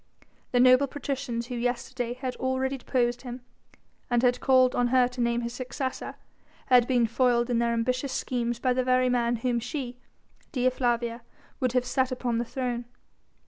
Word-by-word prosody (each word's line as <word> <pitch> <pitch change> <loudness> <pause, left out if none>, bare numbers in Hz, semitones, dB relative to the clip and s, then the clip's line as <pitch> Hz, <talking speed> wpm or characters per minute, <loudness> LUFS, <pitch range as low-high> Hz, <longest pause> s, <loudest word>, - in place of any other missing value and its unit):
The 245 - +2
noble 255 +2 +6
patricians 270 -4 -4
who 250 - -7
yesterday 245 0 -2
had 255 -1 -4
already 260 +1 -1
deposed 245 -2 0
him, 245 -1 -7 0.7
and 240 0 +2
had 250 0 +3
called 255 -1 +4
on 245 - +2
her 250 0 +4
to 250 0 -5
name 235 0 +1
his 235 0 -4
successor, 260 +1 -4 0.5
had 245 -2 +5
been 245 -3 +3
foiled 240 +1 +2
in 235 - +2
their 235 0 +1
ambitious 255 +4 -1
schemes 240 -2 -2
by 250 +1 +1
the 255 0 0
very 255 0 +3
man 240 -1 +1
whom 240 +1 0
she 245 0 -5 0.5
Dea 255 -3 +2
Flavia 240 -2 -1 0.4
would 255 -2 0
have 250 -1 +2
set 260 +1 0
upon 245 -2 -1
the 240 - -1
throne. 245 -1 -3
250 Hz, 175 wpm, -27 LUFS, 240-255 Hz, 0.7 s, noble